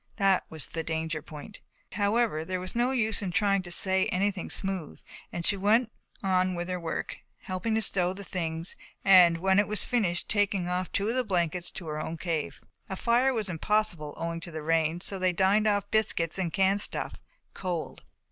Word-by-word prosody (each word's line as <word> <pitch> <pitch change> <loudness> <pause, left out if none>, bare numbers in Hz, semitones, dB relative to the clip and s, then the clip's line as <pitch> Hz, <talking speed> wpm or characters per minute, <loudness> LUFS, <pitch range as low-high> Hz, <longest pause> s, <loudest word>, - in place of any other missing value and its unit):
That 195 -3 +2
was 160 -3 -2
the 165 - -4
danger 160 -1 -3
point. 155 +6 -11 0.3
However, 205 -4 +1
there 185 +2 -3
was 185 +3 -6
no 240 +2 +2
use 225 -5 0
in 195 - -2
trying 200 0 +2
to 180 - -9
say 190 +2 +3
anything 190 0 -1
smooth 190 -6 -1 0.3
and 170 -1 -4
she 200 - +4
went 215 +4 +2 0.3
on 185 -1 +2
with 175 +1 -4
her 180 0 -2
work, 165 -2 -4 0.2
helping 185 +4 -2
to 220 - +2
stow 180 -3 +2
the 195 +2 -7
things 165 -3 -2 0.3
and, 180 -3 +7
when 190 +2 +2
that 205 - +4
was 210 -2 0
finished, 205 -8 0
taking 205 -3 +1
off 180 +1 -2
two 200 +2 0
of 235 - -1
the 255 - +2
blankets 175 -4 0
to 175 - -8
her 155 -1 -4
own 165 - -5
cave. 165 -3 -3 0.3
A 190 - -3
fire 240 +6 +2
was 220 -5 -2
impossible 175 -3 -1
owing 165 0 -3
to 170 - -9
the 155 -2 -6
rain 165 +1 +1
so 195 0 -2
they 185 -1 +2
dined 200 +4 +3
off 205 -1 0
biscuits 190 -5 +1
and 175 -3 -1
canned 195 +3 +2
stuff, - - -4 0.3
cold. 180 -4 -4
185 Hz, 195 wpm, -28 LUFS, 170-205 Hz, 0.3 s, and